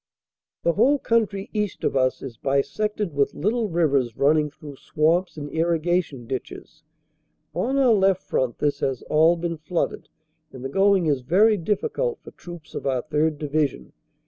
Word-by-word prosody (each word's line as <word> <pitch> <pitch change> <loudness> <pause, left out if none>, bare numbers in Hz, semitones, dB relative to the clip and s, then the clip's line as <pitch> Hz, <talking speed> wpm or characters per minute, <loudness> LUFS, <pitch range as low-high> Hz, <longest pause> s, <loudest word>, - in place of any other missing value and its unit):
The 170 - +2
whole 260 - +4
country 215 -6 0
east 210 -3 -2
of - - 0
us 130 -1 +1
is 130 -4 -7
bisected 175 - -1
with 140 -1 0
little 215 +6 0
rivers 140 -9 +1
running 150 +1 +3
through 145 -1 -12
swamps 165 +6 0
and 145 -1 -5
irrigation 165 -4 0
ditches. 130 +5 -7 0.7
On 265 +3 -1
our 260 -4 +5
left 190 -2 +2
front 130 -2 -1
this 145 -1 0
has 135 -2 -2
all 160 +3 +5
been 170 0 -3
flooded 155 +3 -3 0.4
and 130 0 -9
the - - -2
going 195 +2 +3
is 145 -4 +1
very 205 - +4
difficult 430 - -1
for - - -11
troops 175 -3 -12
of - - -4
our 130 -2 0
3rd. 155 0 0
Division. 145 - -2
160 Hz, 160 wpm, -24 LUFS, 140-195 Hz, 0.7 s, our